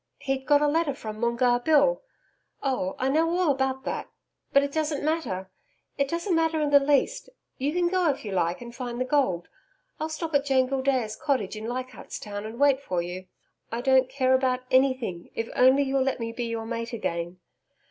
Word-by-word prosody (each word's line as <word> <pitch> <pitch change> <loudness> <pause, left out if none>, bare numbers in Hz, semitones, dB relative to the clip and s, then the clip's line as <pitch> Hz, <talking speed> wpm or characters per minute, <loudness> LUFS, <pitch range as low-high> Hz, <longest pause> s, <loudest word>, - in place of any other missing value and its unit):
He'd 270 -1 -3
got 290 0 +5
a - - +4
letter 300 -2 +1
from 215 -4 -7
Moongarr 240 +1 +2
Bill 320 - +4 0.6
Oh, 255 -9 -1
I 260 - 0
know 315 +4 +2
all 360 -5 +3
about 265 -1 -1
that. - - -4 0.4
But 280 - +5
it 280 - -2
doesn't 300 -1 -1
matter 190 - -2 0.4
it 280 0 +1
doesn't 340 +5 -1
matter 325 -1 +2
in 295 -1 0
the 285 - +8
least. 290 - +1 0.3
You 280 +3 0
can 350 +1 +1
go 360 -2 +2
if 270 -5 -2
you 205 - -4
like 175 0 0
and 235 0 -9
find 240 -1 -5
the 255 - 0
gold 255 - +1 0.5
I'll 315 +1 -2
stop 320 0 -4
at 285 -1 +3
Joan 265 -2 +3
Gildea's 260 -5 0
cottage 255 -9 -1
in 215 +1 -6
Leichardt's 255 +1 -5
Town 205 0 -6
and 230 +3 -9
wait 280 -1 +4
for 180 -9 -2
you 180 +2 -7 0.4
I 230 +1 -2
don't 260 0 +4
care 260 -1 +2
about 260 -1 +2
ANYTHING 255 -9 +1
if 230 - -1
you'll - - -12
only 265 +2 +4
let 270 -1 +1
me 230 0 -3
be 235 +1 -4
your 230 -1 -3
Mate 230 +1 -4
again. 175 -5 -3
260 Hz, 200 wpm, -26 LUFS, 230-285 Hz, 0.6 s, the